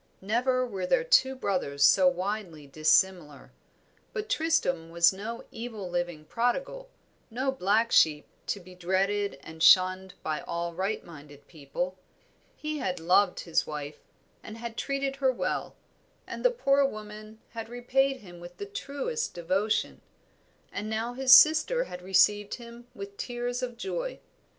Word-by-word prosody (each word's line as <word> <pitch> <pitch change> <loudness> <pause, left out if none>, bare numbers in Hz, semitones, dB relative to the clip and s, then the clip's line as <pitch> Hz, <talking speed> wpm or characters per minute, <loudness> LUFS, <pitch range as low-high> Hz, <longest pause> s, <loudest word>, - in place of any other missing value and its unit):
Never 250 +5 +1
were 195 -6 -4
there 475 - +2
two 485 - +4
brothers 180 - -1
so 180 +7 +6
widely 180 -3 -2
dissimilar. 155 0 +1 0.6
But 430 -2 -4
Tristram 180 - 0
was 170 +2 +4
no 220 +5 -6
evil 225 -4 -6
living 175 -3 -3
prodigal, 265 - -2 0.4
no 260 +4 -1
black 225 -1 +1
sheep, 150 -2 +4 0.2
to 200 - -2
be 185 0 -14
dreaded 195 +2 -1
and 160 0 -11
shunned 185 +2 +5
by 155 -1 -2
all 170 0 -4
right 190 +5 -3
minded 145 -3 -14
people; 175 +4 -5 0.6
he 305 0 -4
had 180 -6 -2
loved 180 +3 +3
his 165 - 0
wife, 150 -1 -6 0.4
and 215 - -9
had 230 0 -7
treated 275 0 -2
her 265 -1 +2
well, 255 - -3 0.5
and - - -7
the - - +6
poor 280 - +2
woman 215 -3 -6
had 225 -1 -7
repaid 260 +2 0
him 175 -4 -13
with 175 0 -12
the 405 - -5
truest 410 - -4
devotion; 190 +5 -1 0.7
and 210 +1 -5
now 225 +2 -2
his 260 +1 +1
sister 315 - +7
had 180 - -9
received 195 +2 +3
him 235 0 -12
with 200 0 -9
tears 245 0 -3
of 245 -2 -4
joy. - - -4
210 Hz, 145 wpm, -28 LUFS, 180-255 Hz, 0.7 s, sister